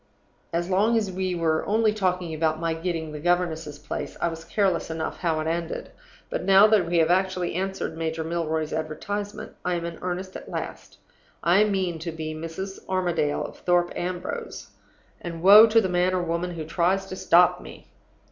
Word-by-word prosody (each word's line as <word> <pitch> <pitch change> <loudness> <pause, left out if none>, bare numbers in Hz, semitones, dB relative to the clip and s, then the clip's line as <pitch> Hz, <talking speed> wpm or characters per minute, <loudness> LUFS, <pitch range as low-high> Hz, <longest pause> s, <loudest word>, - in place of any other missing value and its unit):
As 170 +1 -1
long 205 +5 +3
as 210 -4 -1
we 185 0 -2
were 160 -2 +1
only 215 +1 +2
talking 180 -5 -1
about 155 0 0
my 165 -1 0
getting 165 -1 -3
the 150 - -6
governess's 165 -3 0
place, - - -6
I 170 - +1
was 165 0 -7
careless 190 -5 0
enough 160 0 -4
how 165 -3 0
it - - -4
ended. 165 +1 -3 0.4
But - - -3
now 195 +2 +7
that 205 -6 +3
we 170 0 +1
have 165 0 +4
actually 185 -1 +1
answered 190 -2 -3
Major 160 0 -2
Milroy's 160 -1 -2
advertisement, 200 +7 -4
I 180 0 0
am 170 -1 -3
in 170 -1 -6
earnest 185 +1 -4
at - - -8
last. - - -6 0.5
I 185 +5 +5
mean 190 -5 -1
to 165 +1 -4
be 155 -1 -5
Mrs. 165 +5 -6
Armadale 175 -6 0
of - - -10
Thorpe 175 -1 +2
Ambrose; 180 0 -5 0.5
and 170 -1 -6
woe 210 +4 +10
to 225 +1 +5
the 205 - +1
man 180 +1 +1
or 180 - 0
woman 170 +1 -2
who 160 -2 -5
tries 180 +4 +1
to 190 - -7
stop 180 - +4
me! - - -12
175 Hz, 185 wpm, -25 LUFS, 160-190 Hz, 0.5 s, woe